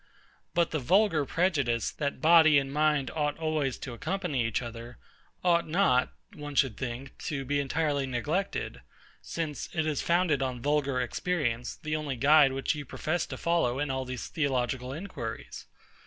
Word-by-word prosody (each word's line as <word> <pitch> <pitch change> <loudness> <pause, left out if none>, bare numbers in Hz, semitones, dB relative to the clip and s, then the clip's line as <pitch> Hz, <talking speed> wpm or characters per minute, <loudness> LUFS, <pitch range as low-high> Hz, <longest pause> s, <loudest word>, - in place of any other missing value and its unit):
But 170 -1 +2
the 155 - 0
vulgar 165 - +3
prejudice, 140 - +1
that 140 -1 -3
body 160 -2 +7
and 135 0 0
mind 150 -3 +2
ought 150 -2 -1
always 155 -5 -1
to 125 - -7
accompany 155 -1 -2
each 115 +1 -1
other, 120 +1 -8 0.5
ought 170 -1 +3
not, 155 -7 +3 0.2
one 145 -1 -7
should 135 -5 +3
think, 130 +2 -5
to 140 -3 -3
be 145 +2 0
entirely 140 0 0
neglected; 150 +10 -2 0.4
since 160 -3 -4
it 160 -2 0
is 155 -3 0
founded 170 -5 +2
on 130 -2 -2
vulgar 140 0 +1
experience, 125 -3 -1
the 155 0 -3
only 150 -3 -2
guide 145 +2 +6
which 135 +3 0
you 150 -2 -5
profess 155 +5 -2
to - - -6
follow 165 -8 +1
in 145 0 -1
all 130 0 -2
these 125 -1 -5
theological 130 -3 -1
inquiries. 145 - -6
145 Hz, 160 wpm, -29 LUFS, 130-160 Hz, 0.5 s, body